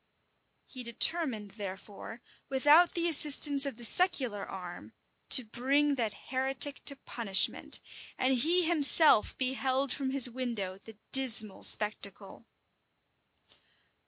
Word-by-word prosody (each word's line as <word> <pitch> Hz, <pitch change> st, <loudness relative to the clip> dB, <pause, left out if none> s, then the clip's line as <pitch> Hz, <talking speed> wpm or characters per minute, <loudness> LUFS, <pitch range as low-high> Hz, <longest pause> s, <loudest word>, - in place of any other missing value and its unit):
He 255 Hz, -, -11 dB
determined, 235 Hz, -, +1 dB
therefore, 205 Hz, +3 st, -11 dB, 0.3 s
without 295 Hz, +6 st, +1 dB
the 340 Hz, 0 st, -2 dB
assistance 290 Hz, -2 st, +3 dB
of 265 Hz, -5 st, -9 dB
the 240 Hz, -, -11 dB
secular 255 Hz, -, +1 dB
arm, 180 Hz, -2 st, -12 dB, 0.4 s
to 255 Hz, -, +5 dB
bring 275 Hz, +6 st, -2 dB
that 230 Hz, -6 st, -7 dB
heretic 265 Hz, +2 st, 0 dB
to 280 Hz, -, -1 dB
punishment; 210 Hz, -7 st, -3 dB, 0.4 s
and 260 Hz, +1 st, -1 dB
he 330 Hz, +9 st, -1 dB
himself 310 Hz, -6 st, +3 dB
beheld 265 Hz, +1 st, -3 dB
from 275 Hz, -2 st, -5 dB
his 265 Hz, -1 st, +4 dB
window 230 Hz, -7 st, -7 dB
the 220 Hz, +1 st, -17 dB
dismal 230 Hz, -6 st, +3 dB
spectacle. 210 Hz, 0 st, -4 dB
260 Hz, 110 wpm, -27 LUFS, 215-285 Hz, 0.4 s, to